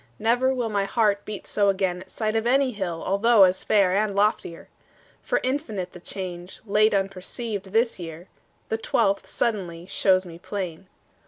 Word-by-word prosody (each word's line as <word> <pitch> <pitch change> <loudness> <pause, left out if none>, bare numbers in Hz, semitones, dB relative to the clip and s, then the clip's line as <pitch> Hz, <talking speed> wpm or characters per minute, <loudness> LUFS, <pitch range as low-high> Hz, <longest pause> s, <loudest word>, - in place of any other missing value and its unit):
Never 245 +4 +2
will 245 -3 -1
My 200 -2 0
heart 205 -2 +1
beat 210 -2 -7
so 200 -1 +2
again 190 -2 0
at 190 - -13
sight 215 -1 -2
Of 225 +1 +1
any 265 +1 +3
hill 185 -7 -4
although 205 +2 +5
as 185 0 +3
fair 195 -3 +3
And 205 -1 +1
loftier. 200 -5 0 0.5
For - - 0
infinite 225 - -2
The 180 - -10
change, 180 -1 -7
late 210 0 +3
unperceived, 195 +2 -3
this 225 +3 0
year, 165 +1 -8 0.4
The 220 - -1
twelfth, 200 -2 +1
suddenly, 180 -7 -2
shows 185 0 +2
me 170 -1 -10
plain. 185 -2 -5
200 Hz, 165 wpm, -25 LUFS, 185-220 Hz, 0.5 s, although